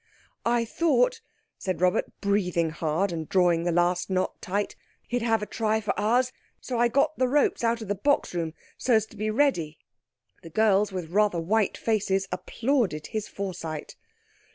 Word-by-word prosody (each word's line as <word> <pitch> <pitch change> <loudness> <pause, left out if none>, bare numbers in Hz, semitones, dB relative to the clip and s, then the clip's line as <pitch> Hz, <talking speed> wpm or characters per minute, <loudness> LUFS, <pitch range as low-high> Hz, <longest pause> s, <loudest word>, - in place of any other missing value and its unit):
"I 235 0 +2
thought," 455 - +2 0.4
said 185 -4 -2
Robert, 180 0 +2 0.2
breathing 180 -5 +1
hard, 165 +4 0
and 160 -2 -5
drawing 175 -3 +3
the 175 - +2
last 175 +2 +1
knot 185 -1 -1
tight, 200 +2 -2 0.3
"he'd 245 0 -1
have 225 -2 +1
a - - -1
try 220 +1 0
for 215 - -1
Ours, 245 +5 +2 0.3
so 245 -3 -3
I 240 - +5
got 280 +5 +1
the 255 - +3
ropes 285 -2 +2
out 230 0 +1
of - - -9
the 205 - +1
box 280 +6 +1
room, 165 -2 -3 0.2
so 250 - +3
as 220 -1 +3
to 220 - -17
be 215 +1 -2
ready." 215 - +1 0.6
The 165 - -10
girls, 210 +2 +3
with 180 -4 -5
rather 205 -2 +2
white 205 +5 +1
faces, 195 -3 0
applauded 220 - -1
his 215 -1 -2
foresight. 165 -6 -5
205 Hz, 175 wpm, -26 LUFS, 180-230 Hz, 0.6 s, I